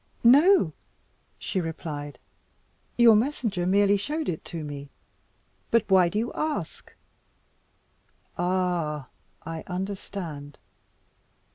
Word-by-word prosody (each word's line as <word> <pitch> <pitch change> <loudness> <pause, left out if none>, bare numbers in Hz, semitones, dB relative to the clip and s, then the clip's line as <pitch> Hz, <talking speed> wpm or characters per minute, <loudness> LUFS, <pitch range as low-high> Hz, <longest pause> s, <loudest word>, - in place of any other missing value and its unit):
"No!" 280 - +6 0.6
she 185 - -2
replied, 150 -3 -6 0.8
"your 235 -2 +7
messenger 215 -7 0
merely 200 +1 +4
showed 300 +9 -3
it 160 - -4
to 165 -2 -6
me. 145 -1 -7 0.8
But 230 -2 +2
why 185 -2 +6
do 205 - -3
you 230 +3 -1
ask? 305 -1 -4 1.4
Ah! 175 -6 -1 0.4
I 165 -1 -5
understand. 180 -6 -5
185 Hz, 95 wpm, -26 LUFS, 160-225 Hz, 1.4 s, your